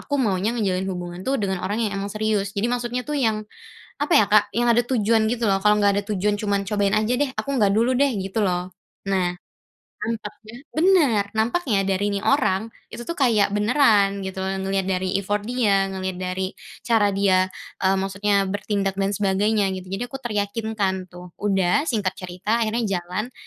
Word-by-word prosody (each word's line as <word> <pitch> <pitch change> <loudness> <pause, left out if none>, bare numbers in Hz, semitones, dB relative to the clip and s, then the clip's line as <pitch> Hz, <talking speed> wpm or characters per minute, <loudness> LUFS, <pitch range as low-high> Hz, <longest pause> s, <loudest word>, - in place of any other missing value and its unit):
aku 285 - -4
maunya 215 -2 0
ngejalin 190 -4 -1
hubungan 180 -1 -5
tuh 265 +8 0
dengan 190 -6 -2
orang 210 +5 -1
yang 205 - -2
emang 200 - -3
serius. 210 -1 -1
Jadi 200 - 0
maksudnya 245 0 -2
tuh 300 - -5
yang 215 -3 0 0.5
apa 290 - 0
ya, 215 - +6
Kak, 210 0 +6
yang 240 +1 +2
ada 240 +1 +3
tujuan 225 -3 +2
gitu 230 -1 0
loh, 195 - +3
kalau 210 0 +4
nggak 200 0 +4
ada 205 - 0
tujuan 205 +1 0
cuman, 200 -1 0
"Cobain 200 0 0
aja 215 +3 +2
deh," 275 -2 0
aku - - -4
nggak 205 -4 +3
dulu 235 +4 +2
deh 280 -1 +3
gitu 195 +3 -1
loh. 180 0 -1 0.4
Nah, 185 -2 +1 0.7
nampaknya 215 0 -6 0.2
bener, 315 - +3
nampaknya 225 - +1
dari 195 +1 0
nih 200 - -2
orang, 220 -6 +1 0.2
itu - - -6
tuh 335 +7 -5
kayak 225 -7 +3
beneran 210 -3 +3
gitu 190 0 -6
loh, 190 0 -2
ngelihat 195 0 -1
dari 185 0 0
effort 205 +1 -1
dia, 205 -4 +1
ngelihat 190 -1 -3
dari 185 +1 -3 0.3
cara 220 -4 +3
dia, 190 -1 +2 0.3
eee, 190 0 +3
maksudnya 195 +1 +1
bertindak 200 0 -1
dan 195 0 0
sebagainya 205 +1 +1
gitu. 185 0 -8
Jadi 195 +6 -3
aku 270 +2 -8
teryakinkan 205 -4 -2
tuh, 180 0 -12
udah, 195 +4 +2
singkat 205 -6 -1
cerita 185 +5 -2
akhirnya 225 +1 0
jalan 185 +8 -5
205 Hz, 185 wpm, -23 LUFS, 190-225 Hz, 0.7 s, ya